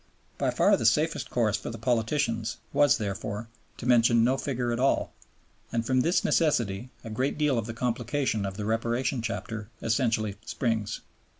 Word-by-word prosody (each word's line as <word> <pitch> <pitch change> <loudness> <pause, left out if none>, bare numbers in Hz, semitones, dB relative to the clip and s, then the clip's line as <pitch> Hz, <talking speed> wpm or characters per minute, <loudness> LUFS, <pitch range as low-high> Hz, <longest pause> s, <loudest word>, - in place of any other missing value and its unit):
By - - +1
far - - +4
the - - -3
safest - - +1
course - - +1
for - - -6
the - - -6
politicians 115 -1 0 0.2
was, 145 -3 +5
therefore, 105 +1 -4 0.3
to - - -7
mention 120 -1 +5
no 130 +3 +3
figure 125 -3 -2
at 120 - -1
all; 135 +2 +1 0.6
and 115 0 -1
from 130 +1 +2
this 170 +7 +2
necessity 120 - +1
a 115 - -7
great 130 +7 -1
deal 150 -3 +2
of 110 - -4
the 115 - -4
complication 120 -1 -1
of 95 0 -4
the 105 - -3
Reparation 115 +3 0
Chapter 110 -2 -4
essentially 110 -3 0
springs. 115 -4 -2
115 Hz, 170 wpm, -28 LUFS, 110-130 Hz, 0.6 s, was